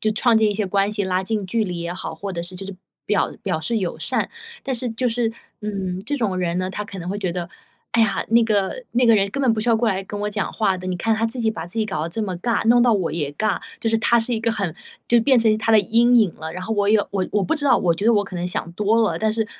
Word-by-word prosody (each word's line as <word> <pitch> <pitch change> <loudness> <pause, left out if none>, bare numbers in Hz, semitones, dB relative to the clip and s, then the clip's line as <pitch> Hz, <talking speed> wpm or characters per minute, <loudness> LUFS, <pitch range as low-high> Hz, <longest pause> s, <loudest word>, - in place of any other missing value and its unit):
就 215 - +1
创 235 +1 +3
建 215 -1 +3
一 205 - -2
些 205 -1 -1
关 195 +1 +1
系， 210 -2 -2
拉 185 0 0
近 210 0 -2
距 225 +3 0
离 180 -3 -4
也 170 +1 -3
好， 180 -2 -5
或 195 +4 -6
者 170 -1 -3
是 180 +1 -7
就 195 - -7
是 195 0 -7 0.3
表 210 - +1
表 180 -5 -1
示 235 +7 -1
友 185 -5 -2
善。 - - -1 0.3
但 265 -2 -2
是 245 +1 -3
就 235 +3 -2
是， 230 -1 0 0.3
嗯， 190 -3 -3
这 290 - -1
种 215 -7 0
人 175 -1 -1
呢， 185 +1 -1
他 210 - -4
可 200 -2 -9
能 175 +1 -5
会 205 - -3
觉 185 -4 -1
得： 170 -1 -5 0.4
“哎 230 - +3
呀， 220 -3 +2
那 235 0 +5
个 215 - 0
那 245 +1 +3
个 230 - +7
人 195 -1 +2
根 275 - -2
本 245 - +4
不 220 - -1
需 240 - -1
要 230 - +5
过 230 +1 0
来 195 -2 0
跟 205 +1 -6
我 210 0 -2
讲 205 -1 -2
话 195 -4 0
的， 185 - -7
你 180 -1 -2
看 225 +5 +1
她 225 +1 +1
自 230 +3 -5
己 225 -1 +2
把 220 - -6
自 200 +6 -5
己 220 - +2
搞 195 -7 -3
得 - - -3
这 220 +6 -3
么 190 -3 -3
尬， 230 +3 0
弄 240 +1 +6
到 245 - +4
我 180 -6 -1
也 150 -4 -2
尬。 215 +8 -1 0.2
“就 225 - +1
是 225 - +2
他 235 +1 +3
是 230 +2 -1
一 225 - 0
个 230 +1 +1
很 195 -7 -2 0.3
就 235 -1 +4
变 260 +1 +4
成 220 -2 +3
他 225 - 0
的 220 - +7
阴 235 +5 +4
影 205 -7 +2
了， 160 0 -6
然 185 - -5
后 220 - -2
我 205 -1 +1
也 215 +1 +5
我 190 -2 -1
我 205 -2 +2
不 320 - +1
知 290 -2 -2
道， - - +6
我 170 -3 +2
觉 200 +6 -2
得 235 - +5
我 205 -1 +2
可 190 - -10
能 175 0 -2
想 170 -1 -4
多 210 +4 +2
了， 220 - 0
但 220 0 +1
是 220 0 -1
210 Hz, 335 characters per minute, -22 LUFS, 185-225 Hz, 0.4 s, 个